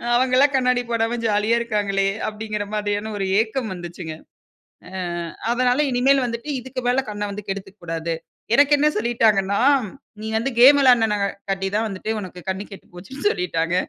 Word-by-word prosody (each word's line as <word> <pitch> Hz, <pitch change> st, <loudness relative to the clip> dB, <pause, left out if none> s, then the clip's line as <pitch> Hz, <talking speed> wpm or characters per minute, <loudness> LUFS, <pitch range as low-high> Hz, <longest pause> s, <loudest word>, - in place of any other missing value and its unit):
அவங்கலாம் 260 Hz, +3 st, +3 dB
கண்ணாடி 250 Hz, -1 st, +2 dB
போடாம 230 Hz, +1 st, 0 dB
ஜாலியா 210 Hz, +2 st, +2 dB
இருக்காங்களே". 200 Hz, -4 st, 0 dB, 0.2 s
அப்டிங்கிற 210 Hz, -1 st, -4 dB
மாரியான 205 Hz, +1 st, -2 dB
ஒரு 195 Hz, -, -1 dB
ஏக்கம் 225 Hz, -1 st, -3 dB
வந்துச்சுங்க. 175 Hz, -2 st, -7 dB, 0.7 s
அ, -, -, -14 dB, 0.6 s
அதனால 250 Hz, +2 st, +2 dB
இனிமேல் 265 Hz, +2 st, +3 dB
வந்துட்டு 235 Hz, +4 st, -5 dB
இதுக்கு 255 Hz, +1 st, -6 dB
மேல 250 Hz, -, +2 dB
கண்ண 210 Hz, 0 st, -4 dB
வந்து 205 Hz, 0 st, -8 dB
கெடுத்துக்க 195 Hz, +1 st, -6 dB
கூடாது. 165 Hz, 0 st, -3 dB, 0.4 s
எனக்கு 285 Hz, +2 st, +5 dB
என்ன 295 Hz, -, +3 dB
சொல்லிட்டாங்கன்னா, 215 Hz, -3 st, +2 dB, 0.6 s
"நீங்க 220 Hz, 0 st, -4 dB
வந்து 270 Hz, +4 st, -2 dB
கேம் 280 Hz, +3 st, +8 dB
விளையாடினனால 205 Hz, -6 st, +2 dB
தான் 220 Hz, +1 st, +1 dB
வந்துட்டு, 200 Hz, +1 st, -4 dB
உனக்கு 185 Hz, -2 st, -8 dB
கண் 190 Hz, +2 st, -4 dB
கெட்டு 195 Hz, -, -12 dB
போச்சுன்னு 265 Hz, -, -4 dB
சொல்லிட்டாங்க. 165 Hz, -1 st, -1 dB
215 Hz, 145 wpm, -22 LUFS, 195-245 Hz, 0.7 s, கேம்